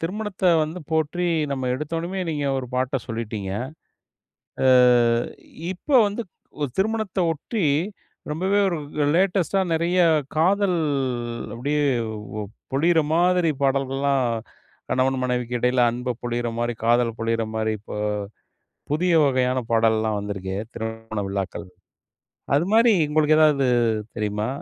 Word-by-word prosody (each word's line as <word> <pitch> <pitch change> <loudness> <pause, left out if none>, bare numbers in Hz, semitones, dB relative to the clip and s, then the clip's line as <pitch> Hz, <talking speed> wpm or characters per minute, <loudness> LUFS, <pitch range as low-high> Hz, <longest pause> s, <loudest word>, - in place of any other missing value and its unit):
திருமணத்த 195 +3 -4 0.2
வந்து 155 +4 -4
போற்றி 160 +3 0 0.3
நம்ம 130 -2 -2
எடுத்தோனமே 165 +6 -3
நீங்க 145 -2 -2
ஒரு 130 - -5
பாட்ட 130 +1 0
சொல்லிட்டீங்க. 110 -4 -4 1.2
அ - - +6 1.1
இப்ப 185 - -20 0.2
வந்து 205 +3 -4 0.4
ஒ - - +2
திருமணத்த 215 0 -1
ஒட்டி, 180 +5 -3 0.7
ரொம்பவே 190 +6 +1
ஒரு 175 -3 -1 0.4
லேடஸ்டா 190 0 +2
நெறைய 170 +3 +1 0.4
காதல் 185 +2 +3 0.8
அப்டியே 145 +5 0 0.9
பொழிற 165 +5 +3
மாதிரி 175 0 +3
பாடல்கள்லாம் 135 0 +1 0.7
கணவன் 130 +1 +2
மனைவிக்கு 125 -1 -1
இடையில 125 +1 +2
அன்ப 125 +1 -3
பொழியற 120 0 -2
மாதிரி 120 0 0
காதல 120 0 +3
பொழியற 115 0 0
மாதிரி 110 0 0
இப்போ, 105 - -9 1.0
புதிய 175 +4 +2
வகையான 130 -1 +1
பாடல்லாம் 110 -1 +2
வந்துருக்கே 95 -2 -4 0.2
திருமண 110 -1 -5
விழாக்கள்ல. 95 -1 -4 0.9
அதுமாரி 220 +10 +4 0.2
உங்களுக்கு 155 0 +3
எதாவது 150 -4 +4 0.5
தெரியுமா? 105 +1 -2
140 Hz, 105 wpm, -23 LUFS, 115-175 Hz, 1.2 s, அ